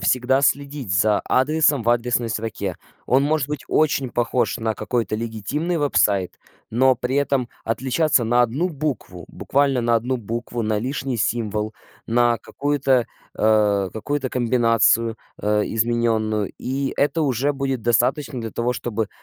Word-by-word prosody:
всегда 130 +1 +2
следить 140 -5 0
за 105 +3 +3
адресом 145 0 +2
в 115 - +2
адресной 120 -1 +1
строке. 105 -4 -3 0.3
Он 130 +2 +3
может 150 -2 0
быть 150 -2 -4
очень 140 -4 +1
похож 120 +1 0
на 110 -1 -1
какой-то 115 -3 -2
легитимный 115 - -2
веб-сайт, 100 - +1 0.3
но 130 +3 +4
при 125 +3 -2
этом 140 -4 +1 0.2
отличаться 130 +3 +1
на 120 +2 +3
1 135 +10 0
букву, 140 - -4
буквально 140 -2 +1
на 120 0 +2
1 125 +3 -1
букву, 120 +1 -4
на 110 -1 0
лишний 130 +2 -3
символ, 110 -1 -1 0.3
на 120 0 +2
какую-то, 135 -2 0 0.3
э, 105 -3 +2
какую-то 135 +5 -2
комбинацию, 115 -2 +2 0.3
э, 105 0 +2
измененную. 110 -2 0
И 135 +1 -2
это 155 +3 +1
уже 140 +1 +1
будет 135 -4 -2
достаточно 125 +3 +1
для 115 -1 -5
того, 120 +1 0
чтобы 115 -3 -3
120 Hz, 140 wpm, -22 LUFS, 110-135 Hz, 0.3 s, но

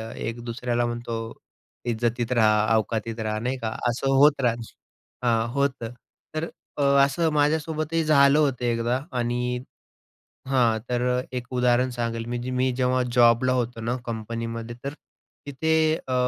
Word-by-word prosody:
1 115 +2 -4
दुसऱ्याला 120 0 -1
म्हणतो 120 0 -4 0.7
इज्जतीत 120 +1 -1
राहा, 110 -2 +4
औकातीत 110 +1 -2
राहा, 110 -1 -2
नाही 125 +3 -2
का, 115 -3 -3 0.2
असं 135 +3 0
होत 145 0 +5
राहत 120 -2 +2 0.7
हां 115 -1 +2
होतं, 130 -4 -1 0.4
तर 155 - -1 0.3
अ, - - -1 0.2
असं 165 +4 0
माझ्यासोबतही 155 +2 +1
झालं 140 -1 +5
होतं 135 -5 +1
एकदा 120 +2 0 0.2
आणि 125 +1 -1 0.9
हां, 120 -4 +3
तर 125 0 +1
1 125 -1 -4
उदाहरण 125 0 +3
सांगेल 115 -1 -3
म्हणजे 120 +1 -4
मी 130 +1 +1
जेव्हा 130 0 +2
जॉबला 120 +1 +5
होतो 120 -2 -2
ना 120 +2 -1
कंपनीमध्ये 115 +1 -5
तर 140 +1 -4 0.5
तिथे 160 +3 0 0.3
अ, 130 - -2
120 Hz, 135 wpm, -25 LUFS, 115-130 Hz, 0.9 s, होत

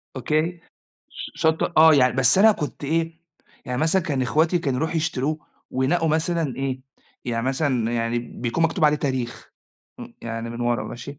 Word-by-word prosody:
أوكي، 155 +6 -1 0.5
ش - - -8
شطة 160 +1 +1
آه 160 0 +8
يعني 130 -3 +4
بس 135 +6 +4
أنا 220 +2 +7
كنت 150 -5 -6
إيه، 165 +2 -1 0.4
يعني 125 0 -3
مثلًا 165 +4 +2
كان 145 -6 -1
اخواتي 160 +7 +2
كانوا 135 -6 -1
يروحوا 160 +3 -1
يشتروه 155 -1 -1 0.3
وينقّوا 160 +6 +1
مثلًا 160 -3 0
إيه، 135 -1 -3 0.4
يعني 115 0 -2
مثلًا 130 -4 0
يعني 115 0 0
بيكون 120 +5 -2
مكتوب 165 0 +1
عليه 150 0 +4
تاريخ، 130 -5 -4 0.5
امم، - - -10
يعني 115 0 -5
من 120 +1 -7
ورا، 120 0 0
ماشي، 140 +4 -8
145 Hz, 165 wpm, -23 LUFS, 125-160 Hz, 0.5 s, آه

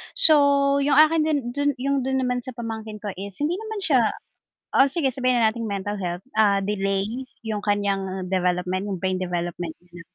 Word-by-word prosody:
so 280 - +5
yung 280 +1 +2
akin 310 +1 +6
din 305 -2 +2
dun 285 +1 0
yung 275 +1 0
dun 265 -1 0
naman 250 0 0
sa 250 0 -9
pamangkin 220 -2 -6
ko 205 - -3
is 200 -1 -7
hindi 320 +5 0
naman 440 -1 -5
siya 275 -8 +3 0.7
o 270 - +6
sige 275 -4 0
sabihin 255 -1 +1
na 220 -2 +4
nating 230 -2 -5
mental 200 +1 -3
health, 175 0 -4
ah, 200 -2 +3
delay 195 -1 0 0.4
yung 215 -2 -2
kanyang 195 -2 -1
development 180 +1 0
yung 190 - -2
brain 185 +1 -1
development 175 -2 -3
niya. 175 -1 -13
220 Hz, 185 wpm, -24 LUFS, 190-275 Hz, 0.7 s, akin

